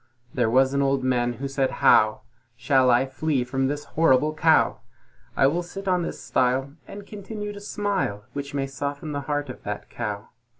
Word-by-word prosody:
There 120 Hz, -3 st, +1 dB
was 130 Hz, +3 st, +3 dB
an 140 Hz, -, +1 dB
Old 135 Hz, -1 st, +1 dB
Man 120 Hz, -1 st, +1 dB
who 135 Hz, +4 st, -5 dB
said 135 Hz, -1 st, 0 dB, 0.2 s
"How 110 Hz, 0 st, +5 dB, 0.4 s
Shall 130 Hz, +2 st, +3 dB
I 125 Hz, +2 st, +4 dB
flee 135 Hz, 0 st, -1 dB
from 135 Hz, +2 st, -1 dB
this 145 Hz, +1 st, -3 dB
horrible 150 Hz, -1 st, +2 dB
Cow? 160 Hz, 0 st, +3 dB, 0.6 s
I 135 Hz, -, +5 dB
will 160 Hz, +6 st, +2 dB
sit 195 Hz, +3 st, -8 dB
on 180 Hz, -1 st, +2 dB
this 170 Hz, -, -4 dB
stile, 130 Hz, +2 st, 0 dB
and 200 Hz, 0 st, -9 dB
continue 210 Hz, 0 st, -6 dB
to 205 Hz, -, -10 dB
smile, 200 Hz, -, -2 dB
Which 140 Hz, 0 st, -5 dB
may 135 Hz, -1 st, 0 dB
soften 140 Hz, +2 st, -5 dB
the 145 Hz, -1 st, -3 dB
heart 145 Hz, 0 st, -1 dB
of 125 Hz, -, -9 dB
that 105 Hz, 0 st, -6 dB
Cow." 105 Hz, -3 st, -5 dB
140 Hz, 185 wpm, -24 LUFS, 130-155 Hz, 0.6 s, How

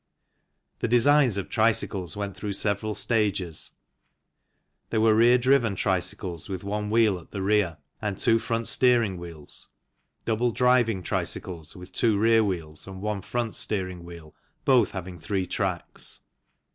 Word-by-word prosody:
The -, -, 0 dB
designs 125 Hz, -1 st, +4 dB
of 100 Hz, -, -3 dB
tricycles 105 Hz, -6 st, 0 dB
went 100 Hz, -1 st, -4 dB
through 105 Hz, -2 st, -4 dB
several 105 Hz, +1 st, -1 dB
stages. 100 Hz, -8 st, -1 dB, 1.2 s
There 110 Hz, -, 0 dB
were 110 Hz, 0 st, +5 dB
rear 120 Hz, +3 st, +6 dB
driven 125 Hz, -4 st, +3 dB
tricycles 90 Hz, -2 st, -2 dB
with 95 Hz, -1 st, -4 dB
one 105 Hz, +1 st, -2 dB
wheel 110 Hz, -4 st, +3 dB
at 85 Hz, -, -17 dB
the 100 Hz, -2 st, -4 dB
rear 100 Hz, -5 st, +2 dB, 0.2 s
and 105 Hz, -3 st, -2 dB
two 115 Hz, +1 st, +3 dB
front 115 Hz, 0 st, -2 dB
steering 120 Hz, -7 st, +3 dB
wheels, 85 Hz, -4 st, -8 dB, 0.6 s
double 115 Hz, +2 st, +1 dB
driving 120 Hz, -5 st, +2 dB
tricycles 85 Hz, -2 st, -4 dB
with 90 Hz, 0 st, -11 dB
two 110 Hz, -4 st, +2 dB
rear 115 Hz, +1 st, +4 dB
wheels 85 Hz, -6 st, -3 dB
and 95 Hz, -1 st, -8 dB
one 105 Hz, 0 st, -2 dB
front 120 Hz, +3 st, -2 dB
steering 90 Hz, -4 st, -2 dB
wheel, 85 Hz, -3 st, -11 dB, 0.3 s
both 125 Hz, -5 st, +5 dB
having 90 Hz, -2 st, -7 dB
three 95 Hz, +2 st, -1 dB
tracks. 90 Hz, -2 st, -3 dB
100 Hz, 145 wpm, -26 LUFS, 90-115 Hz, 1.2 s, rear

